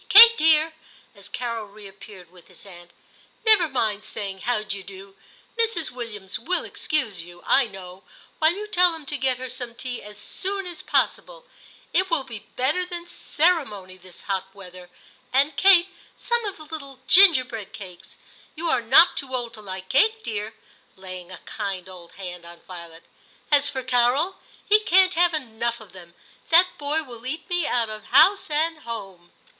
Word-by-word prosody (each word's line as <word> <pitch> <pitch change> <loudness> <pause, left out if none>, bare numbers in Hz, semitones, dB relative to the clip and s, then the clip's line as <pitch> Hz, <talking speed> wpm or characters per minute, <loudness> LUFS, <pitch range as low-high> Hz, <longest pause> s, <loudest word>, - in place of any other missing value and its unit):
Kate, 460 +3 +10
dear/ 315 -1 +4 0.4
as 200 -3 -11
Carol 230 -3 -4
reappeared 200 -3 -14
with 180 -2 -19
his - - -13
aunt, 175 -3 -13 0.6
'never 415 -7 +5
mind 220 -6 -1
saying 195 -3 -6
how 240 -3 -1
d'ye 200 -2 -5
do. 195 0 -12 0.4
Mrs. 440 - 0
Williams 220 -5 -6
will 360 +10 -1
excuse 225 - -1
you, 175 +1 -14
I 270 -2 +3
know, 190 -2 -11 0.4
while 315 +1 +5
you 410 +4 -6
tell 360 -4 +3
them 320 -2 -8
to 295 - -4
get 260 -1 +1
her 255 0 -6
some 245 -2 -7
tea 250 0 -6
as 210 0 -12
soon 390 - -4
as 350 -2 -6
possible; - - -1 0.5
it 375 0 +2
will 330 -6 +1
be 230 -5 -10
better 290 +8 +1
than 350 -1 -7
ceremony 285 - -1
this 185 -1 -12
hot 190 -1 -3
weather; 180 -2 -12 0.4
and, 280 +3 +2
Kate, 380 0 +5 0.3
some 475 -1 -1
of 405 - -5
the 310 - -11
little 280 -4 -9
ginger 335 -6 +8
bread 225 -5 -8
cakes. 185 -2 -12 0.4
You 335 +1 -2
are 255 - +2
not 260 +9 +6
too 260 -2 -4
old 240 -2 -4
to 215 - -12
like 190 -2 -8
cake, 440 +10 +2
dear,' 215 0 -5 0.4
laying 185 -1 -10
a 185 - -8
kind 195 -4 -5
old 180 -2 -12
hand 180 -2 -9
on 170 0 -13
Violet. 170 -2 -11 0.3
* - - -32
As 285 -1 +4
for 265 -1 -5
Carol, 255 +9 +1 0.3
he 425 +1 +6
can't 380 -3 +4
have 345 -1 +2
enough 235 -4 -3
of 215 -4 -14
them; 175 -2 -15 0.3
that 350 +2 +5
boy 295 +2 0
will 240 -5 -12
eat 315 +4 -5
me 355 -4 0
out 235 -2 0
of 215 0 -8
house 385 +10 +4
and 315 +2 -1
home. 195 - -8
245 Hz, 180 wpm, -23 LUFS, 195-325 Hz, 0.6 s, Kate